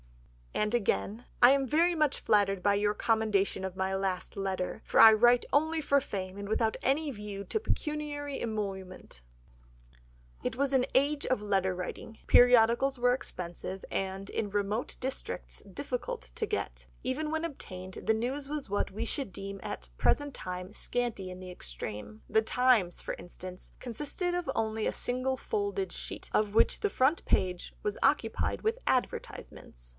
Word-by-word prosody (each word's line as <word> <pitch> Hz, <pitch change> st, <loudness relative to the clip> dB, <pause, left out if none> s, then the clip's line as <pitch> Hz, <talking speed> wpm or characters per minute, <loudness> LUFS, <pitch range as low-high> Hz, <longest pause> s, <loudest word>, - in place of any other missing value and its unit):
And 210 Hz, +1 st, 0 dB
again, 230 Hz, 0 st, 0 dB, 0.2 s
"I 245 Hz, +1 st, +9 dB
am 275 Hz, 0 st, +3 dB
very 335 Hz, +6 st, +3 dB
much 305 Hz, -3 st, +2 dB
flattered 195 Hz, -2 st, +2 dB
by 205 Hz, +2 st, +3 dB
your 205 Hz, +1 st, +2 dB
commendation 215 Hz, -4 st, +1 dB
of 190 Hz, -1 st, -4 dB
my 190 Hz, 0 st, 0 dB
last 190 Hz, -1 st, -2 dB
letter, 195 Hz, +1 st, -2 dB
for -, -, +1 dB
I 225 Hz, -1 st, +11 dB
write 240 Hz, +3 st, +5 dB
only 315 Hz, +3 st, +3 dB
for 280 Hz, -2 st, +3 dB
fame 190 Hz, -4 st, -5 dB
and 200 Hz, 0 st, -6 dB
without 220 Hz, 0 st, +1 dB
any 295 Hz, +4 st, +1 dB
view 205 Hz, -3 st, -6 dB
to 440 Hz, -, -1 dB
pecuniary 295 Hz, -, -3 dB
emolument." 195 Hz, -, -5 dB, 1.2 s
It -, -, -2 dB
was 275 Hz, 0 st, +1 dB
an 255 Hz, -1 st, +3 dB
age 285 Hz, +2 st, +2 dB
of 255 Hz, -5 st, +1 dB
letter 195 Hz, -2 st, +1 dB
writing, 185 Hz, +5 st, -6 dB
periodicals 245 Hz, +2 st, +6 dB
were 245 Hz, 0 st, +4 dB
expensive, 185 Hz, -4 st, -5 dB
and, 195 Hz, +1 st, -3 dB
in 210 Hz, -, -2 dB
remote 205 Hz, +3 st, -1 dB
districts, 265 Hz, +1 st, -4 dB
difficult -, -, -4 dB
to 440 Hz, -, -1 dB
get; 420 Hz, -, -3 dB, 0.2 s
even 300 Hz, +4 st, -1 dB
when 320 Hz, +1 st, -1 dB
obtained, 185 Hz, -, -7 dB
the 220 Hz, -, +3 dB
news 260 Hz, +5 st, -2 dB
was 295 Hz, -6 st, -3 dB
what 205 Hz, -, 0 dB
we 220 Hz, +4 st, -3 dB
should 265 Hz, -3 st, -3 dB
deem 195 Hz, +1 st, -6 dB
at -, -, -5 dB
the 65 Hz, -, -5 dB
present 290 Hz, -1 st, +2 dB
time 180 Hz, 0 st, -6 dB
scanty 235 Hz, -6 st, -2 dB
in 180 Hz, 0 st, -8 dB
the 185 Hz, -1 st, -8 dB
extreme. 105 Hz, -, -7 dB
The 220 Hz, -, +3 dB
Times, 225 Hz, -6 st, +3 dB
for -, -, -4 dB
instance, 180 Hz, +1 st, -9 dB
consisted 295 Hz, -, -3 dB
of 355 Hz, -5 st, -2 dB
only 220 Hz, 0 st, 0 dB
a -, -, 0 dB
single 255 Hz, +1 st, 0 dB
folded 405 Hz, -, -2 dB
sheet, -, -, -6 dB
of 210 Hz, -1 st, +1 dB
which -, -, +4 dB
the 415 Hz, -, +2 dB
front 285 Hz, 0 st, +2 dB
page 180 Hz, -1 st, 0 dB
was 420 Hz, -1 st, -1 dB
occupied -, -, +1 dB
with 450 Hz, +3 st, +1 dB
advertisements. -, -, -3 dB
220 Hz, 165 wpm, -30 LUFS, 195-275 Hz, 1.2 s, I